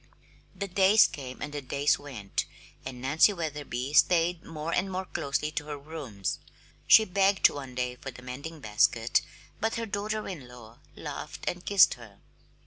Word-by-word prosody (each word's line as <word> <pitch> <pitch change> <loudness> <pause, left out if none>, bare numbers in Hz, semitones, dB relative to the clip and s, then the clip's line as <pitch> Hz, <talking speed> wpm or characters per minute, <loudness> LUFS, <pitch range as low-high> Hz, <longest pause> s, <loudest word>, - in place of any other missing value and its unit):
The 200 - -4
days 195 +3 +6
came 130 -3 -6
and 150 0 -6
the 145 - -4
days 140 +2 +1
went, 120 -9 -4 0.4
and 130 -1 -7
Nancy 155 +9 +4
Wetherby 145 -6 -4
stayed 170 +2 +4
more 160 0 -5
and 190 +1 0
more 190 +1 -3
closely 150 -1 -2
to 150 -1 -4
her 150 -1 -5
rooms. 140 - -5 0.5
She 220 - +8
begged 195 0 +4
one 135 -3 -8
day 125 0 -2
for 135 - -7
the 125 -1 -12
mending 140 +5 -7
basket, 115 +1 +2 0.4
but 225 +1 0
her 230 - -2
daughter 215 +1 -3
in 155 -10 -7
law 120 -2 -14 0.2
laughed - - -7
and 180 0 -2
kissed 200 -2 +6
her. 115 -5 -14
150 Hz, 165 wpm, -28 LUFS, 125-185 Hz, 0.5 s, She